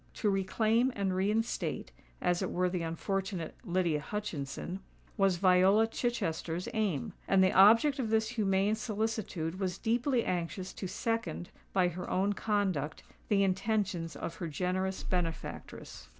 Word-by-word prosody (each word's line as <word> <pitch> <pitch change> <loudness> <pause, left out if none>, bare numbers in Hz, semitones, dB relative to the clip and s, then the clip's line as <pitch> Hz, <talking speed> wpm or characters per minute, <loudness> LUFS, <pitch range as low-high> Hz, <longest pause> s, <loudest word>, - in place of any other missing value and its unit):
To 210 - +1
reclaim 220 +6 +2
and 195 -2 0
reinstate, 210 +4 -1 0.3
as 175 -1 +2
it - - -1
were 180 0 0
the 180 -2 -1
unfortunate 180 +1 -3
Lydia 175 -6 +1
Hutchinson, 180 -2 -4 0.4
was 195 -2 +3
Viola 190 +4 +5
Chichester's 185 -8 -2
aim; 205 - -1
and 190 -1 +5
the 185 - +4
object 230 +9 +6
of 235 -4 -1
this 220 0 +2
humane 205 -3 +1
solicitude 215 -6 -2
was 185 -2 -1
deeply 240 +2 +1
anxious 180 +1 -3
to 190 - -5
second, 230 -3 -2 0.2
by 185 -2 +3
her 175 +1 -6
own 195 +2 +1
conduct, 190 -8 -1 0.2
the 200 -2 +3
intentions 190 -4 0
of 165 +3 -5
her 170 - -4
generous 185 +4 -2
benefactress. 170 - -4
190 Hz, 135 wpm, -31 LUFS, 180-215 Hz, 0.4 s, object